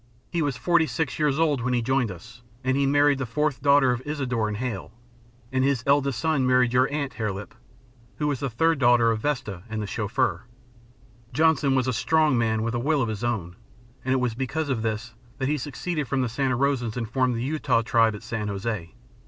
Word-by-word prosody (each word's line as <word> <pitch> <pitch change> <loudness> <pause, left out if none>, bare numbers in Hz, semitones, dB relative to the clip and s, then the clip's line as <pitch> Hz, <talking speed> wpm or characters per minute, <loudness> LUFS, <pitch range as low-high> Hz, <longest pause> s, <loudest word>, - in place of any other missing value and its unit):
He 170 - 0
was 145 -4 -1
forty 170 0 +2
six 150 -5 -2
years 150 -2 +2
old 150 -5 +2
when 125 +1 0
he 120 - +1
joined 130 -1 +1
us, 110 +7 -11 0.2
and 130 0 +1
he 140 0 +2
married 145 0 +3
the 130 - -2
fourth 140 +2 -1
daughter 140 -2 +5
of 125 0 -2
Isadore 130 -7 -1
and 105 -1 -3
Hale, 115 -6 -4 0.6
and 130 0 +1
his 135 -4 +1
eldest 140 -3 +2
son 140 0 +1
married 125 -1 +3
your 130 +2 +3
aunt, 145 -2 -2
Hare 110 -3 -2
Lip, 100 +2 -8 0.6
who 150 - -2
was 145 -4 0
the 140 - -2
third 160 +6 +1
daughter 120 -2 +5
of 110 - -1
Vesta 110 -9 -2
and 110 0 -3
the 105 - -2
Chauffeur. 110 +7 -1 0.9
Johnson 150 -1 +3
was 130 -1 +1
a 130 - +1
strong 155 +4 +2
man, 110 -2 +1
with 115 0 -2
a 120 - -1
will 145 +2 +1
of 115 - -2
his 110 +1 -4
own. 100 -8 -2 0.5
And 130 - -1
it 130 - +3
was 125 -2 0
because 135 +5 -3
of 125 -5 0
this 110 +1 -3 0.2
that 135 - -1
he 150 0 0
seceded 150 +2 -3
from 130 +2 0
the 125 - -1
Santa 130 +1 0
Rosans 125 -4 0
and 115 -2 -2
formed 125 +1 +1
the 115 - -2
Utah 135 -4 +1
Tribe 115 -2 +3
at 105 - -10
San 110 -2 -3
José. 100 -3 -4
125 Hz, 220 wpm, -25 LUFS, 115-140 Hz, 0.9 s, daughter